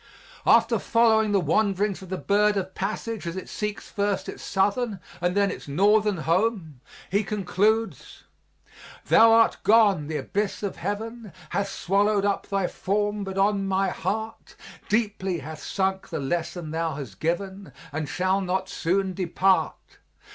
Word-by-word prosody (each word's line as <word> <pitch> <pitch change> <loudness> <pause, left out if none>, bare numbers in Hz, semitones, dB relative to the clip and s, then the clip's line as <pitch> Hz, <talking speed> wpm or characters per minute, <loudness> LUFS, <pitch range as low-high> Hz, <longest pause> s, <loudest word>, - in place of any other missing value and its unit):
After - - +5
following 220 -2 +3
the 200 - +3
wanderings 195 +4 +1
of 190 - -11
the 190 - -2
bird 205 +1 +2
of 190 -1 -3
passage 210 -1 -4
as 170 - -4
it 190 - -6
seeks 210 -1 -5
first 200 -1 -1
its - - -7
southern 200 +2 0 0.2
and 180 +2 0
then 200 -1 +3
its - - -8
northern 205 +6 +3
home, 170 - -1 0.3
he 200 +3 +2
concludes: 210 -1 -1 0.8
Thou 225 0 +6
art 225 0 +5
gone; 200 -7 +4
the 155 -1 -2
abyss 200 +10 -2
of 200 - -3
heaven 220 +3 -5 0.2
Hath 200 0 -1
swallowed 200 +2 +1
up 200 -1 -1
thy 195 -2 0
form, 205 +3 -1
but 195 0 -6
on 195 0 +2
my 195 0 +1
heart 220 +6 -4 0.3
Deeply 205 -4 0
hath 155 +1 -8
sunk 190 0 -2
the - - -3
lesson 165 +3 -3
thou 165 -1 -2
hast 125 -9 -8
given, 190 +2 -3 0.2
And 150 -1 -4
shall 185 +2 +1
not 190 0 -2
soon 190 +2 0
depart. 185 +1 0
195 Hz, 150 wpm, -25 LUFS, 180-210 Hz, 0.8 s, Thou